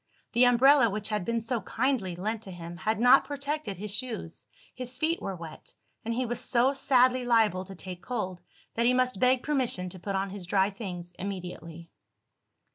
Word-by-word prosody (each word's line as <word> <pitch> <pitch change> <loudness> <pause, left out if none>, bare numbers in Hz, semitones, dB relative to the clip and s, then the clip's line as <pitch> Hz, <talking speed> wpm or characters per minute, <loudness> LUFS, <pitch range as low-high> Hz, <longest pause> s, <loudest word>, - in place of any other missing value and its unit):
The 245 +1 +5
umbrella 250 +1 +6
which 210 +1 -3
had 210 -3 -1
been 230 0 0
so 225 0 -2
kindly 220 -4 -1
lent 215 +5 -3
to 195 - -9
him, 170 -1 -8
had 215 +5 -1
not 245 +3 +7
protected 285 - -3
his 210 +2 -6
shoes; 215 -7 -5 0.3
his 250 0 -7
feet 325 +4 0
were 195 - -4
wet; 165 -2 -11 0.3
and 230 - -3
he 250 +2 0
was 240 0 -3
so 255 +2 +2
sadly 255 -2 +3
liable 220 -6 +2
to 195 0 -10
take 180 0 -8
cold 190 -8 -4 0.3
that 235 +1 +1
he 250 - +4
must 255 -5 +1
beg 255 0 +3
permission 250 -11 0
to 185 - -10
put 195 +2 -3
on 195 0 -1
his 195 -3 -7
dry 195 +1 +2
things 180 -4 -7
immediately. 175 -3 -7
220 Hz, 190 wpm, -28 LUFS, 185-250 Hz, 0.3 s, not